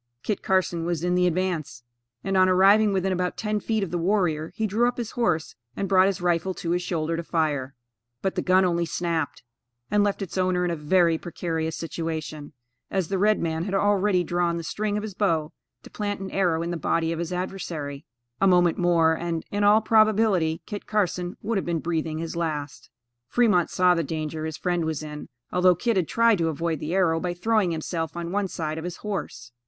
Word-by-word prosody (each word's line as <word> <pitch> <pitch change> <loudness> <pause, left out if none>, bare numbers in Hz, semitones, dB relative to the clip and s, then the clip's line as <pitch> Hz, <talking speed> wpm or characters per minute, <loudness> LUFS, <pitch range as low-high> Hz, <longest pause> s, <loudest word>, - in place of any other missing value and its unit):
Kit 210 - -2
Carson 185 -3 +1
was 170 -1 -2
in 180 0 +1
the 180 0 +3
advance, 170 -9 -2 0.4
and 195 0 -1
on 185 0 +5
arriving 200 +3 +5
within 190 0 0
about 180 -1 -1
ten 210 -1 -1
feet 220 -1 -1
of 180 - -4
the 175 - -1
warrior, 170 -4 0
he 220 - -1
drew 220 +4 +2
up 245 - -2
his 235 -3 -4
horse 175 -10 0 0.2
and 195 - -2
brought 190 0 +5
his 195 -1 -1
rifle 175 +1 0
to 170 - -3
his 175 +1 +1
shoulder 165 -2 -2
to 165 - -2
fire, 150 -5 -1 0.5
but 190 - 0
the - - -1
gun 185 +1 +4
only 170 -1 +1
snapped, 165 -4 -2 0.5
and 205 0 +4
left 205 0 0
its 190 0 -4
owner 185 -1 +1
in 175 - 0
a - - -1
very 165 +1 +2
precarious 160 -1 -3
situation, 160 -2 -5 0.4
as 190 -4 -1
the 195 -1 -1
red 215 +2 +3
man 160 0 -2
had 195 0 -2
already 200 -2 +2
drawn 175 0 0
the 170 - -5
string 210 +4 -2
of 210 - -3
his 215 -2 -5
bow 165 -6 0 0.3
to - - -13
plant 205 -1 -3
an 195 0 -6
arrow 175 -4 +1
in 170 - -3
the 175 - -2
body 165 0 0
of 165 - -3
his 170 0 -3
adversary. 165 -6 -4 0.4
A 195 - +5
moment 175 -2 +4
more 170 -2 +4
and, 165 -1 -3
in 205 0 0
all 210 +2 +6
probability, 215 -7 +3
Kit 205 - -7
Carson 180 -4 -1
would 215 -1 0
have - - -5
been 170 -1 0
breathing 160 -1 -2
his 165 +1 -4
last. 150 -4 -4 0.4
Fremont 205 - +3
saw 180 -1 +4
the 165 -1 0
danger 155 +1 -4
his 160 -1 -4
friend 175 -2 0
was 160 -1 -2
in, 150 -1 -8 0.2
although 180 0 +5
Kit 230 +6 0
had 180 -4 +1
tried 230 -3 +3
to 165 - +1
avoid 160 0 -2
the 165 +4 -3
arrow 165 -4 +3
by 175 0 -3
throwing 215 +1 +1
himself 165 0 -3
on 170 0 -4
one 200 0 0
side 160 -3 -4
of - - -7
his 175 -1 -5
horse. 125 - -5
175 Hz, 215 wpm, -25 LUFS, 160-195 Hz, 0.5 s, all